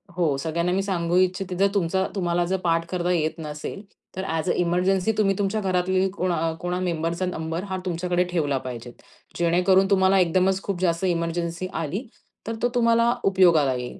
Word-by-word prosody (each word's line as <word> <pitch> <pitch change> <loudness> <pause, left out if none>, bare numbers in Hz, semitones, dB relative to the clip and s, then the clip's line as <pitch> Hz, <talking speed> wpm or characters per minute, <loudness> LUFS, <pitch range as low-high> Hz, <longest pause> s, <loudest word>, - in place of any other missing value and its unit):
हो 160 -6 +1
सगळ्यांना 170 +4 -1
मी 195 - +1
सांगू 175 -3 0
इच्छिते 185 0 +1
जर 200 +1 +4
तुमचा 190 0 +1
तुम्हाला 175 -2 0
जर 190 +2 0
पाठ 165 -1 +1
करता 180 -1 -1
येत 160 -1 0
नसेल, 150 +5 -6 0.3
तर 190 - -3
ऍस 160 +3 -2
अ - - +3
एमर्जन्सी 180 +4 +1
तुम्ही 195 -2 +2
तुमच्या 205 +2 0
घरातली 185 0 +1
कोणा 175 -4 -1
कोणा 180 0 -2
मेंबरचा 170 0 -1
नंबर 165 0 -3
हा 190 - -2
तुमच्याकडे 180 0 0
ठेवला 145 -6 0
पाहिजे. 120 -1 -7 0.5
जेणेकरून 180 +3 +3
तुम्हाला 190 0 +4
एकदमच 185 +2 +2
खूप 190 -3 -3
जास्त 170 0 +1
एमर्जन्सी 170 0 -2
आली, 170 - -3 0.4
तर 225 - -2
तो 245 - +2
तुम्हाला 230 0 +3
उपयोगाला 170 -8 +4
येईल. 125 0 -6
180 Hz, 170 wpm, -24 LUFS, 165-190 Hz, 0.5 s, जर